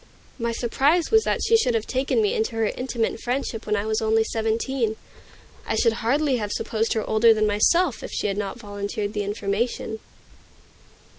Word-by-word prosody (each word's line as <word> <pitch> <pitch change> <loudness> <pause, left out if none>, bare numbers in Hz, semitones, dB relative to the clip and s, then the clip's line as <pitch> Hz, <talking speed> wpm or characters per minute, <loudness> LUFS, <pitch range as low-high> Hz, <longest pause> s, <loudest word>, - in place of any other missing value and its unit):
My 235 0 -1
surprise 275 +8 +1
was 445 0 +5
that - - 0
she 455 - +4
should 250 - +2
have 225 -1 0
taken 270 - 0
me 420 +2 +1
into 445 - -1
her 225 0 +1
intimate 235 0 -2
friendship 245 -3 -3
when 210 - +1
I 205 +1 -1
was 220 0 0
only 220 0 +3
seventeen. 225 +1 -1 0.7
I - - 0
should 230 -2 +3
hardly 270 +3 +2
have 210 -3 -3
supposed 225 +1 -1
her 220 - -2
older 220 +1 +5
than 215 0 +2
myself, 215 - +2
if - - -6
she - - -3
had 200 -2 0
not 200 0 -4
volunteered 205 -1 -4
the 210 - -1
information. 205 +2 -2
225 Hz, 180 wpm, -24 LUFS, 215-260 Hz, 0.7 s, was